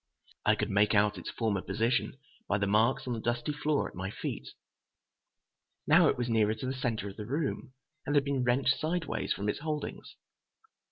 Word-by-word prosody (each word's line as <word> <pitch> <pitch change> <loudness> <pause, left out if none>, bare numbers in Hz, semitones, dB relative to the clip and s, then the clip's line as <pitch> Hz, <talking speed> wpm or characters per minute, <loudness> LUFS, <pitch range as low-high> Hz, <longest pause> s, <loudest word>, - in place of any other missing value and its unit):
I - - +6
could - - -2
make 105 +2 +3
out 105 -1 +3
its - - -6
former 110 -5 -1
position 115 +8 0 0.3
by 100 - +2
the 100 - 0
marks 110 +5 +2
on 125 - -2
the 115 - -3
dusty 120 +5 -1
floor 150 0 0
at - - -12
my 95 +1 -4
feet. 65 -9 -5 1.4
Now - - +6
it - - +2
was 120 -1 -1
nearer 110 -2 +2
to 110 - -6
the 130 - -1
center 120 -5 -2
of 100 - -12
the 105 - -5
room, 140 -1 -2 0.3
and 145 - +1
had 145 - +5
been 140 -2 0
wrenched 130 +2 +2
sidewise 165 0 -2
from 100 - -1
its 105 - -1
holdings. 150 -1 -5
120 Hz, 190 wpm, -30 LUFS, 105-135 Hz, 1.4 s, I